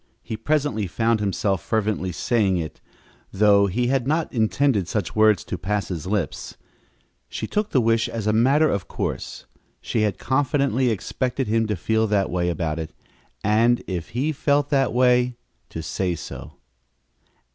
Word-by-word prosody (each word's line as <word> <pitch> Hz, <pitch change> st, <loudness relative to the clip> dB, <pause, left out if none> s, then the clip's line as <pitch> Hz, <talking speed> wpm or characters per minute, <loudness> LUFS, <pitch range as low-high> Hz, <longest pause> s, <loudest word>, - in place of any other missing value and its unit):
He 110 Hz, -, -5 dB
presently 125 Hz, -3 st, 0 dB
found 115 Hz, +4 st, +1 dB
himself 100 Hz, -2 st, 0 dB
fervently 105 Hz, -4 st, -1 dB
saying 100 Hz, 0 st, +1 dB
it, 80 Hz, -2 st, -5 dB, 0.5 s
though 100 Hz, 0 st, +4 dB
he 120 Hz, +6 st, 0 dB
had 130 Hz, 0 st, 0 dB
not 155 Hz, +2 st, 0 dB
intended 110 Hz, -3 st, +1 dB
such 100 Hz, -3 st, -3 dB
words 110 Hz, -3 st, +4 dB
to -, -, -5 dB
pass 105 Hz, +1 st, -2 dB
his 85 Hz, -3 st, -5 dB
lips. 95 Hz, -8 st, -3 dB, 0.7 s
She -, -, -4 dB
took 210 Hz, 0 st, -1 dB
the 130 Hz, -, +2 dB
wish 115 Hz, -1 st, +2 dB
as 115 Hz, -3 st, -4 dB
a 105 Hz, -, +2 dB
matter 135 Hz, +8 st, +4 dB
of 100 Hz, -7 st, -2 dB
course. -, -, -4 dB, 0.3 s
She 110 Hz, -, -2 dB
had 105 Hz, -3 st, 0 dB
confidently 130 Hz, -1 st, +1 dB
expected 125 Hz, +5 st, -2 dB
him 110 Hz, +1 st, +1 dB
to 105 Hz, -, -1 dB
feel 110 Hz, +5 st, 0 dB
that 100 Hz, -2 st, +1 dB
way 90 Hz, -1 st, 0 dB
about 80 Hz, -1 st, -2 dB
it, 80 Hz, 0 st, -6 dB, 0.5 s
and, 115 Hz, +3 st, +3 dB
if 90 Hz, -1 st, -4 dB
he 145 Hz, +5 st, +1 dB
felt 145 Hz, 0 st, +1 dB
that 135 Hz, -3 st, +2 dB
way, 125 Hz, 0 st, +3 dB, 0.3 s
to 80 Hz, -, -6 dB
say 90 Hz, 0 st, -1 dB
so. -, -, -9 dB
110 Hz, 160 wpm, -23 LUFS, 95-125 Hz, 0.7 s, though